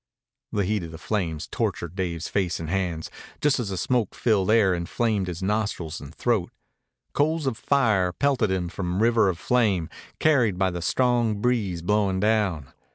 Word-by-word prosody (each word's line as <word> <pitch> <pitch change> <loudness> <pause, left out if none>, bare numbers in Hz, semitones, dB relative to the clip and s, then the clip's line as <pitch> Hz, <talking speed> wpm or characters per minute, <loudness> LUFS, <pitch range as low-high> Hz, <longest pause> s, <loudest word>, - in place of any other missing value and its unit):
The 100 -2 0
heat 105 +1 0
of 85 -2 -7
the 80 - -8
flames 85 -4 -2
tortured 85 -1 -3
Dave's 85 -3 -3
face 90 -4 -1
and 80 -1 -5
hands, 90 -4 -2 0.3
just 145 -2 +2
as 115 -5 -2
the 95 - -3
smoke 120 +3 0
filled 105 -5 +1
air 110 -4 +4
inflamed 95 +3 -1
his 90 0 -5
nostrils 100 -5 -2
and 70 - -9
throat. 115 -8 0 0.6
Coals 155 +1 +1
of 130 -4 0
fire 110 -9 +2
pelted 130 0 +1
him 95 -2 -1
from 90 0 -4
the - - -2
river 115 -2 +4
of 90 - -2
flame, 100 -6 +1 0.3
carried 125 -11 +3
by 95 0 +1
the 85 0 -5
strong 120 0 +1
breeze 105 -8 0
blowing 100 0 +1
down. 100 -9 0
100 Hz, 175 wpm, -25 LUFS, 90-115 Hz, 0.6 s, air